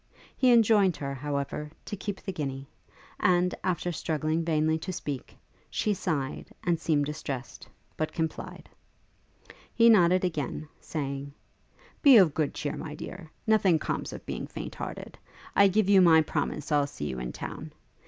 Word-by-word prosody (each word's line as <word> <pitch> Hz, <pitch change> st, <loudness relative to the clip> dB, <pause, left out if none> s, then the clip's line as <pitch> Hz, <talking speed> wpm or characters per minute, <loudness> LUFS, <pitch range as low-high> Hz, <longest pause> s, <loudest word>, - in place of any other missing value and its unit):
He 255 Hz, -2 st, +4 dB
enjoined 215 Hz, -6 st, +5 dB
her, 140 Hz, -1 st, -4 dB
however, 140 Hz, +2 st, -3 dB, 0.2 s
to -, -, -4 dB
keep 200 Hz, 0 st, -5 dB
the -, -, -5 dB
guinea, 135 Hz, -4 st, -4 dB, 0.5 s
and, 180 Hz, 0 st, +3 dB
after 175 Hz, -1 st, -1 dB
struggling 160 Hz, 0 st, -1 dB
vainly 160 Hz, -1 st, +1 dB
to 185 Hz, -, -5 dB
speak, 145 Hz, -6 st, -6 dB, 0.3 s
she 210 Hz, -, 0 dB
sighed, 150 Hz, -8 st, -3 dB, 0.2 s
and 170 Hz, -2 st, +1 dB
seemed 150 Hz, -3 st, +1 dB
distressed, 140 Hz, -4 st, -6 dB, 0.3 s
but 155 Hz, 0 st, -1 dB
complied. 160 Hz, -1 st, -4 dB, 1.1 s
He 230 Hz, 0 st, +6 dB
nodded 185 Hz, -3 st, +5 dB
again, 155 Hz, -2 st, -3 dB
saying, 140 Hz, -2 st, -5 dB, 0.7 s
'Be 275 Hz, -5 st, +9 dB
of 180 Hz, -8 st, +6 dB
good 155 Hz, -1 st, -1 dB
cheer, 145 Hz, -, -3 dB
my 150 Hz, -2 st, -6 dB
dear. 170 Hz, +1 st, -8 dB, 0.2 s
Nothing 205 Hz, -6 st, +4 dB
comes -, -, -3 dB
of -, -, -9 dB
being -, -, -4 dB
faint -, -, -7 dB
hearted. -, -, -7 dB, 0.4 s
I 200 Hz, -, +7 dB
give 200 Hz, +1 st, +2 dB
you 200 Hz, -1 st, +6 dB
my 160 Hz, -3 st, +6 dB
promise 150 Hz, 0 st, -3 dB
I'll 145 Hz, -1 st, +3 dB
see 75 Hz, -, -6 dB
you 65 Hz, -3 st, -4 dB
in 60 Hz, -1 st, -4 dB
town. -, -, -7 dB
160 Hz, 155 wpm, -28 LUFS, 145-185 Hz, 1.1 s, Be